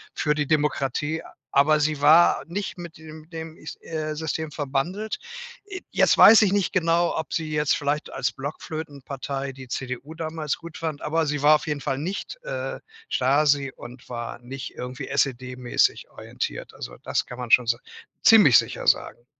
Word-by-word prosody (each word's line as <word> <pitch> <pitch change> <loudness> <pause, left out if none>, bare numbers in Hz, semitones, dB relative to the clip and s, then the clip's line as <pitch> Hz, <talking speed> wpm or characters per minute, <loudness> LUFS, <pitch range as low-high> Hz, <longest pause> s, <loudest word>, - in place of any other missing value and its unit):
für 150 -1 +1
die 150 -2 -1
Demokratie, 150 0 0 0.3
aber 150 +2 +4
sie 150 -1 0
war 155 +1 +6
nicht 190 +3 -4
mit 170 -3 -9
dem 155 0 -12
dem 160 0 -7
is 155 - -8
äh, 155 -1 -4
System 160 0 -3
verbandelt. 155 +10 -2 0.5
Äh, 370 -3 -7
jetzt - - +4
weiß 220 -1 +9
ich 195 - +3
nicht 200 -2 +1
genau, 170 -1 +2
ob 160 - -4
sie 155 -2 -2
jetzt 150 -1 +2
vielleicht 145 +1 -2
als 135 -2 -1
Blockflöten-Partei 140 -2 -5
die 130 -1 -11
CDU 130 +5 -5
damals 160 -2 -3
gut 170 -1 -10
fand, 160 -3 -4
aber 160 +1 0
sie 145 -1 -2
war 150 +1 +7
auf 150 - -2
jeden 145 -2 -2
Fall 135 -2 -2
nicht, 190 - -4
äh, - - -4 0.3
Stasi 140 +1 +2
und 125 +1 -12
war 120 -1 -5
nicht 130 +2 -8
irgendwie 125 +1 -6
SED-mäßig 125 -2 0
orientiert. - - -6
Also, - - -8
das - - -1
kann 125 0 -9
man 120 -2 -5
schon 125 - +6
so 115 0 +2 0.5
ziemlich 210 - +8
sicher - - -4
sagen 120 - +1
150 Hz, 170 wpm, -24 LUFS, 135-160 Hz, 0.5 s, weiß